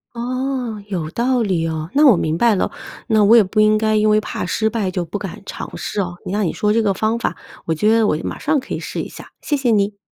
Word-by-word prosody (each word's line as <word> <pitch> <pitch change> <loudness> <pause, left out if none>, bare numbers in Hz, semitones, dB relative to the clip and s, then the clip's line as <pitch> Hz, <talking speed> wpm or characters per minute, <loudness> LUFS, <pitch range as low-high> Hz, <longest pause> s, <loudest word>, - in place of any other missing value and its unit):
哦， 250 -2 -3
有 170 -6 -3
道 250 +1 +1
理 180 -6 0
哦， 160 0 -4
那 295 +1 +6
我 225 - +6
明 160 0 -1
白 230 -1 +4
了， - - -1 0.4
那 215 -2 +3
我 220 +4 +6
也 225 - +7
不 205 +3 -2
应 215 0 +5
该 215 0 +1
因 215 0 +3
为 210 0 +4
怕 - - -4
失 220 -1 0
败 215 -5 -1
就 180 -1 -3
不 205 - -5
敢 195 - -7
尝 - - -6
试 205 - -4
哦。 175 -2 -4
你 - - -4
那 210 - 0
你 170 - -1
说 210 0 +1
这 230 - +3
个 200 -3 +1
方 220 +4 0
法， - - -2 0.3
我 165 - 0
觉 210 +7 +2
得 225 -2 +3
我 - - +2
马 - - -5
上 300 -1 +1
可 255 - -7
以 - - -2
试 - - -4
一 - - -7
下， - - -12
谢 295 - -1
谢 260 -3 0
你。 200 -1 +1
215 Hz, 290 characters per minute, -19 LUFS, 190-235 Hz, 0.4 s, 也